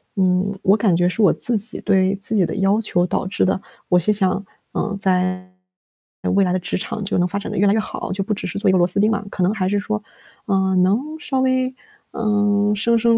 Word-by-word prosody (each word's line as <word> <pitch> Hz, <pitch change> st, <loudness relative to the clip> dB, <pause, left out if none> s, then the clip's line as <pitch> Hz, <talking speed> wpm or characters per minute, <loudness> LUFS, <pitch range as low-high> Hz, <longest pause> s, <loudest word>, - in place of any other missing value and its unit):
嗯， 185 Hz, +1 st, +2 dB
我 195 Hz, -, +5 dB
感 205 Hz, -4 st, +2 dB
觉 175 Hz, +1 st, +2 dB
是 200 Hz, +5 st, -1 dB
我 200 Hz, -, +6 dB
自 240 Hz, -, -1 dB
己 210 Hz, +3 st, -3 dB
对 195 Hz, -1 st, +2 dB
自 205 Hz, +2 st, -3 dB
己 185 Hz, -4 st, +3 dB
的 -, -, -4 dB
要 195 Hz, +3 st, +2 dB
求 175 Hz, -4 st, +1 dB
导 -, -, -1 dB
致 190 Hz, -, +1 dB
的， 190 Hz, 0 st, 0 dB, 0.3 s
我 180 Hz, -, +5 dB
是 195 Hz, -, +2 dB
想， 195 Hz, -1 st, 0 dB, 0.3 s
嗯， 205 Hz, -2 st, -2 dB
在 185 Hz, -1 st, 0 dB, 0.8 s
未 200 Hz, -, +4 dB
来 180 Hz, -, +1 dB
的 185 Hz, -, +1 dB
职 180 Hz, -, -4 dB
场 210 Hz, +3 st, -5 dB
就 200 Hz, -, -1 dB
能 180 Hz, -, +2 dB
发 200 Hz, +3 st, -2 dB
展 -, -, -6 dB
得 -, -, -4 dB
越 200 Hz, +1 st, +3 dB
来 200 Hz, -, +4 dB
越 220 Hz, -, +2 dB
好， 210 Hz, -, -5 dB
就 195 Hz, +1 st, -2 dB
不 210 Hz, -, -2 dB
只 210 Hz, -, -4 dB
是 -, -, -4 dB
做 205 Hz, -, 0 dB
一 -, -, +5 dB
个 -, -, +4 dB
螺 175 Hz, -, +4 dB
丝 200 Hz, -, -1 dB
钉 215 Hz, +2 st, +4 dB
嘛， 210 Hz, -, -1 dB
可 185 Hz, -, -2 dB
能 195 Hz, +4 st, +2 dB
还 185 Hz, -4 st, -1 dB
是 205 Hz, +1 st, +1 dB
说， 210 Hz, +1 st, -3 dB, 0.4 s
嗯， 190 Hz, -2 st, +2 dB
能 195 Hz, +5 st, +3 dB, 0.2 s
稍 270 Hz, -3 st, -2 dB
微， 260 Hz, 0 st, +1 dB, 0.4 s
嗯， 205 Hz, -1 st, +1 dB
升 230 Hz, +3 st, +2 dB
升 230 Hz, 0 st, +3 dB
200 Hz, 270 characters per minute, -20 LUFS, 185-210 Hz, 0.8 s, 我